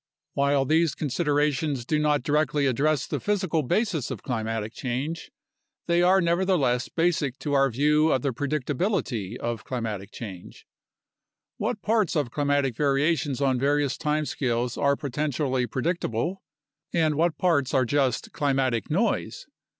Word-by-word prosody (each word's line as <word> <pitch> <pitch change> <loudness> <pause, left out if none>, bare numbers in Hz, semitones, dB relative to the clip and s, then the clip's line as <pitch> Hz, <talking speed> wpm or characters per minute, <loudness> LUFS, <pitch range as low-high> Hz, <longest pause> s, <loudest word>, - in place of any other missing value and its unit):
While 140 -1 +2
these 160 +1 +2
considerations 145 -2 0
do 155 +4 +1
not 150 -1 +2
directly 150 -1 +1
address 140 +4 +1
the - - -3
physical 190 -6 0
basis 165 - 0
of - - -6
climatic 110 -2 -3
change,, 135 +6 -4 0.6
they 170 0 +2
are 185 +2 +5
nevertheless 170 -8 +1
basic 165 -6 0
to 145 - -3
our 135 -1 +4
view 150 +5 +3
of 130 - +1
the 135 -3 0
pre 145 +5 -3
dictability 140 - -1
of 120 -2 -4
climatic 110 -6 -4
change. 95 -6 -9 0.9
What 215 -1 -3
parts 215 -5 +1
of 145 -6 0
climatic 145 -3 +1
variations 145 0 +1
on 130 -2 +2
various 140 0 +1
time 150 0 -1
scales 120 -4 -1
are 140 0 +2
potentially 135 -2 -1
predictable, 165 - -2 0.5
and 160 -3 +2
what 165 +2 +1
parts 160 -8 +2
are 130 -2 +3
just 130 -1 0
climatic 135 -6 0
noise? 230 - -1
145 Hz, 140 wpm, -26 LUFS, 130-160 Hz, 0.9 s, are